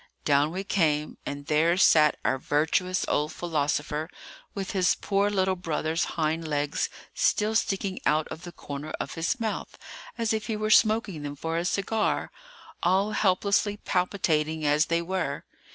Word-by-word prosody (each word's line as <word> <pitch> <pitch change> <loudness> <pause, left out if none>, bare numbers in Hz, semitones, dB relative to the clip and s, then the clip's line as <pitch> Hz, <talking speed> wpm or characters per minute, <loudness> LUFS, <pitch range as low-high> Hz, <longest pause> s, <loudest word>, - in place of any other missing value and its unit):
Down 145 0 +3
we 190 +3 -3
came; 155 -6 0
and 145 0 -5
there 160 +4 +2
sat 155 -5 +5
our 135 - +1
virtuous 160 +7 +1
old 150 +1 0
philosopher, 150 -1 -1 0.5
with 195 -2 -3
his 185 -2 +2
poor 200 0 +1
little 190 -2 +1
brother's 165 -2 -1
hind 160 0 0
legs 145 -1 -1 0.2
still 220 - +1
sticking 195 -3 0
out 155 +1 +2
of 160 - -7
the 175 - -8
corner 145 -2 -7
of - - -4
his 165 +10 -1
mouth, 220 -2 -4 0.4
as 230 -2 0
if 215 -1 -2
he 220 - -1
were 215 0 -1
smoking 215 -7 +3
them 145 0 -5
for 160 +3 -3
a 170 +1 -1
cigar, 205 +4 0 0.5
all 190 +4 +2
helplessly 200 +1 +1
palpitating 160 -6 0
as 150 +2 +3
they 170 0 +1
were. 175 -6 -2
170 Hz, 155 wpm, -27 LUFS, 150-200 Hz, 0.5 s, sat